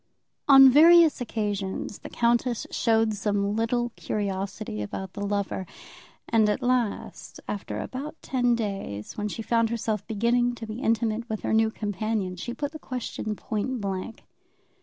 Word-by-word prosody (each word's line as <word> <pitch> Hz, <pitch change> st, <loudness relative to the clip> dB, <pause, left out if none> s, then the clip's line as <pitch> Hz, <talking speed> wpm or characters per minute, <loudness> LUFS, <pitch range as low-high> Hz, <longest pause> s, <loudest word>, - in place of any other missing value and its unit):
On 270 Hz, -1 st, +9 dB
various 325 Hz, +1 st, +7 dB
occasions 205 Hz, -4 st, -3 dB
the -, -, -9 dB
countess 235 Hz, 0 st, +1 dB
showed 225 Hz, -1 st, +2 dB
some 205 Hz, 0 st, -1 dB
little 240 Hz, +2 st, 0 dB
curiosity 195 Hz, -, -3 dB
about 185 Hz, -, -5 dB
the 200 Hz, -, -6 dB
lover; 200 Hz, -2 st, -2 dB, 0.6 s
and 220 Hz, -2 st, +3 dB
at 210 Hz, +5 st, -1 dB
last, 245 Hz, -4 st, -1 dB
after 205 Hz, -1 st, -4 dB
about 285 Hz, +5 st, -6 dB
ten 245 Hz, -2 st, +1 dB
days, 195 Hz, -, -4 dB
when 210 Hz, 0 st, -2 dB
she 225 Hz, +2 st, -5 dB
found 230 Hz, 0 st, +2 dB
herself 220 Hz, -3 st, -2 dB
beginning 240 Hz, +2 st, +1 dB
to 230 Hz, -, -7 dB
be 220 Hz, +3 st, -6 dB
intimate 230 Hz, -1 st, 0 dB
with 215 Hz, -1 st, -3 dB
her -, -, -1 dB
new 220 Hz, 0 st, +4 dB
companion, 210 Hz, -2 st, -2 dB
she 180 Hz, +7 st, -5 dB
put 285 Hz, +4 st, -4 dB
the 310 Hz, -, -9 dB
question 245 Hz, -5 st, -4 dB
point 225 Hz, +5 st, -3 dB
blank. 195 Hz, +2 st, -4 dB
220 Hz, 150 wpm, -26 LUFS, 205-240 Hz, 0.6 s, On